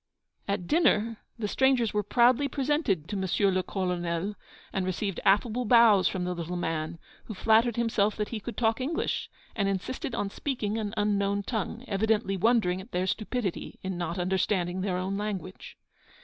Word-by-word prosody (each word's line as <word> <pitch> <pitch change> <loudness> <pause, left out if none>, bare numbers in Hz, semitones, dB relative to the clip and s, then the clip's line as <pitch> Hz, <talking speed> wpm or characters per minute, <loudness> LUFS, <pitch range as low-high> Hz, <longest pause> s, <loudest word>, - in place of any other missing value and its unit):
At 200 -3 -1
dinner 230 - +2 0.2
the 220 -3 -2
strangers 255 -1 +2
were 210 - +2
proudly 245 +6 +3
presented 275 - 0
to 210 - -3
M. 190 +1 +1
le 185 - +2
Colonel, 180 0 -2 0.4
and 190 - 0
received 185 +1 -2
affable 215 +5 +3
bows 225 -5 +6
from 185 -2 -2
the 180 0 -1
little 175 0 -4
man, 165 -1 -2 0.3
who 215 - -7
flattered 225 +3 +3
himself 220 -3 +1
that 210 -1 -2
he 225 - -4
could 215 +1 -7
talk 225 +1 +1
English, 310 +6 -2 0.3
and 200 -3 +1
insisted 195 +6 -3
on 195 - -2
speaking 225 -6 -2
an 210 0 -4
unknown 200 -1 +1
tongue, 225 +2 -3
evidently 210 0 +1
wondering 190 -3 +2
at 210 - -14
their 180 +1 0
stupidity 215 -1 -3
in 190 -1 -3
not 175 0 -3
understanding 185 0 0
their 185 -2 -1
own 190 +2 -2
language. 195 -3 -5
205 Hz, 165 wpm, -28 LUFS, 185-230 Hz, 0.4 s, bows